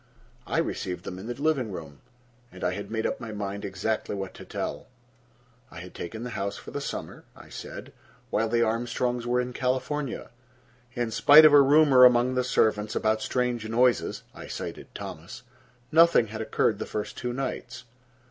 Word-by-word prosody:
I - - -1
received 90 -1 -2
them 90 -1 -6
in 100 - -8
the 120 +2 -5
living 140 -7 0
room, 80 -6 -9 0.5
and 90 - -10
I 90 - +1
had 100 +2 -6
made 110 0 -2
up - - -1
my 115 -2 -7
mind 100 -1 -5
exactly 100 +3 -2
what 95 -1 -5
to - - -11
tell. - - -5 0.8
I - - -10
had 90 +1 -10
taken 110 +7 -6
the 125 - -5
house 100 -2 -3
for - - -10
the - - -4
summer, - - -6
I - - -14
said, - - -9 0.4
while 110 +1 +1
the 115 +1 +2
Armstrongs 120 +1 -1
were 125 +1 +2
in 125 0 -3
California. 130 +2 -2 0.6
In 120 -2 -1
spite 145 +7 +8
of 150 - +7
a 145 - +9
rumor 140 -2 +6
among 125 0 +6
the 125 0 +1
servants 110 -3 +1
about 110 0 +1
strange 120 -3 -1
noises—I 125 +2 0
cited - - -6
Thomas—nothing 130 +2 0
had 110 +1 -5
occurred 110 -1 0
the - - -4
first 105 - -4
two 125 - -3
nights. 125 -1 -5
120 Hz, 175 wpm, -27 LUFS, 105-125 Hz, 0.8 s, a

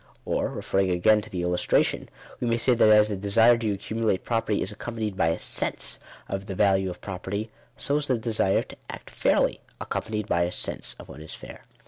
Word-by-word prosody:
Or, - - 0
referring 95 -1 0
again 105 +5 +4
to 110 - -12
the 90 -3 -3
illustration, 90 0 +1 0.3
we 120 - -1
may 115 0 +2
say 125 +2 +3
that 115 -2 +5
as 105 0 +6
the 105 - -1
desire 110 +5 +4
to 115 - -2
ac 100 -2 0 0.2
cumulate 110 -4 0
property 115 -3 0
is - - -4
accompanied 110 -1 -4
by 85 - +2
a 80 - +1
sense - - 0 0.3
of 100 0 -4
the 95 - -4
value 95 -1 +3
of 90 - -8
property, 100 +3 -5 0.3
so 145 - +1
is 150 -1 -2
the 130 - +2
desire 110 -4 +1
to - - -13
act - - -9
fairly, - - +1 0.2
accompanied 105 -1 -3
by 85 - +1
a 85 +1 +1
sense - - -3
of - - -12
what 75 - -11
is 80 - -6
fair. - - -12
105 Hz, 210 wpm, -26 LUFS, 95-115 Hz, 0.3 s, as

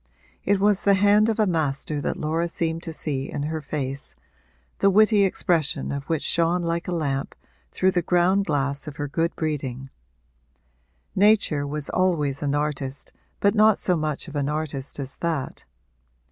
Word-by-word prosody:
It 200 0 +2
was 205 0 +2
the 200 -1 +5
hand 205 +2 +4
of 220 - 0
a 215 - +4
master 150 -4 -1
that - - -2
Laura 160 +3 -1
seemed 165 -1 -2
to 170 - -5
see 140 -4 -3
in 145 - -3
her 160 +1 -3
face, 140 -2 -4 0.6
the 195 - +4
witty 210 +1 +5
expression 170 -5 +1
of 140 -1 -4
which 160 -1 -1
shone 170 +1 +1
like 170 0 -2
a - - -2
lamp 140 -5 -2 0.4
through 190 0 +2
the 180 -2 +1
ground 180 +3 +2
glass 140 -3 -1
of 150 - -7
her 145 0 -3
good 165 +4 -1
breeding; 135 -4 -4 1.2
nature 195 -8 +3
was 150 0 -3
always 155 -7 0
an 145 0 0
artist, 145 -2 -3 0.3
but 200 - +3
not 215 -1 +5
so 180 - +1
much 155 -2 -3
of 155 - -9
an 145 -1 0
artist 150 -3 -2
as 135 -1 -5
that. 165 -5 -3
160 Hz, 170 wpm, -24 LUFS, 145-185 Hz, 1.2 s, the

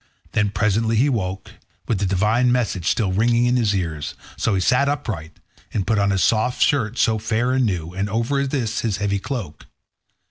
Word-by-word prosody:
Then 105 -2 +1
presently 110 +2 +1
he 130 +6 +3
woke, 95 -7 -3 0.4
with 110 - 0
the 100 - 0
divine 105 +6 +2
message 110 -8 0
still 105 -5 +1
ringing 115 +5 +2
in 120 +1 +2
his 110 -5 +2
ears; 80 -6 -3 0.2
so 110 - 0
he - - +1
sat 125 +9 +3
upright, 105 - -4 0.4
and 100 -4 0
put 110 -2 +1
on 100 0 +2
his 95 -1 +1
soft 115 +3 +1
shirt 120 -5 +2
so 110 -1 +2
fair 115 +3 0
and 130 -2 +2
new, 85 -4 -3
and 100 +2 -2
over 125 +6 0
this 120 -5 -2
his 110 -4 -1
heavy 100 -1 -1
cloak. 100 - -6
110 Hz, 190 wpm, -21 LUFS, 95-120 Hz, 0.4 s, he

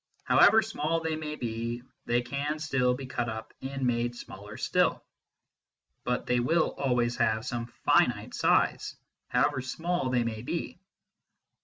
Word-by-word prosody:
However 220 0 +6
small 165 -6 -1
they 160 -1 -1
may 155 -1 -4
be, 115 -1 -4 0.2
they 120 +1 +2
can 140 +5 -2
still 135 -5 +1
be 135 +1 -7
cut 120 -2 -2
up 110 0 -6
and 135 0 -3
made 120 0 0
smaller 105 -2 -10
still. - - +1 1.0
But 125 0 -1
they 125 0 +2
will 160 +7 +2
always 120 -3 +1
have 110 +1 +1
some 120 -2 -3 0.2
finite - - +3
size, - - +2 0.3
however 130 - +1
small 160 +3 -2
they 125 -1 +2
may 110 -2 -3
be. 170 +7 -4
125 Hz, 145 wpm, -29 LUFS, 120-150 Hz, 1.0 s, However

